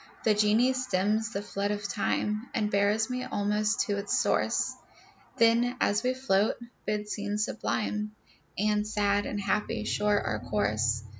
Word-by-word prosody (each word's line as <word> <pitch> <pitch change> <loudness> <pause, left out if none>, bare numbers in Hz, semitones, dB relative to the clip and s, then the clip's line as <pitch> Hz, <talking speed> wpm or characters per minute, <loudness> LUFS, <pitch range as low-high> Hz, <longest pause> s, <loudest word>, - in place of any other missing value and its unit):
The 220 - +4
geni 215 +5 +3
stems 220 -3 0
the 200 -1 -3
flood 200 0 -2
of 205 -1 -2
time, 210 0 -1
And 210 -1 0
bears 205 +4 +2
me 250 0 -2
almost 210 -3 0
to 205 -1 -1
its 200 - 0
source; - - +1 0.6
Then 235 +2 +4
as 205 - +2
we 255 0 0
float, 215 -5 +2 0.3
bids 210 0 -2
scenes 205 +1 -1
sublime 210 -1 -2 0.4
And 210 +1 +1
sad 205 -1 +1
and 205 - -3
happy 210 +2 -1
shore 210 -1 +1
our 110 - -2
course. 110 +3 0
210 Hz, 150 wpm, -29 LUFS, 205-220 Hz, 0.6 s, The